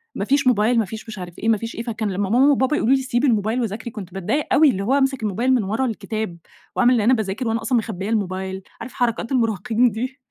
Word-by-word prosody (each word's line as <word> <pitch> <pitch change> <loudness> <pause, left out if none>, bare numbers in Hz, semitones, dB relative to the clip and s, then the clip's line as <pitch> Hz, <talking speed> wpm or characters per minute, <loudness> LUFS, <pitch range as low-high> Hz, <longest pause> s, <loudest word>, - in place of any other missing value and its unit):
ما 200 - -2
فيش 280 +1 +2
موبايل 230 0 +3
ما 220 - +1
فيش 220 +4 -8
مش 215 -3 -7
عارف 175 -1 -8
إيه، 225 - 0
ما 220 - +4
فيش 230 +2 -6
إيه، 230 - -4
فكان 220 -3 -3
لمّا 195 +1 -2
ماما 265 +6 +5
وبابا 265 +2 +2
يقولوا 260 +5 +3
لي 265 - 0
سيبي 255 +2 0
الموبايل 220 +2 +1
وذاكري، 225 +1 -4
كنت 190 -5 -9
باتضايق 195 +11 -1
أوي، 295 +1 +6
اللي 195 -4 -1
هو 250 +6 +1
هامسك 270 -4 +1
الموبايل 235 +6 +1
من 240 -5 +2
ورا 220 +7 -1
الكتاب 220 -5 -4 0.4
وأعمل 245 +1 +4
ان 230 - +2
أنا 240 +5 +4
باذاكر 220 +1 -2
وأنا 225 0 0
أصلًا 250 +1 +1
مخبيّة 210 -3 -3
الموبايل 190 -3 -2 0.2
عارف 230 - -7
حركات 235 0 -1
المراهقين 230 0 +1
دي، 255 +6 -5
225 Hz, 245 wpm, -21 LUFS, 205-255 Hz, 0.4 s, أوي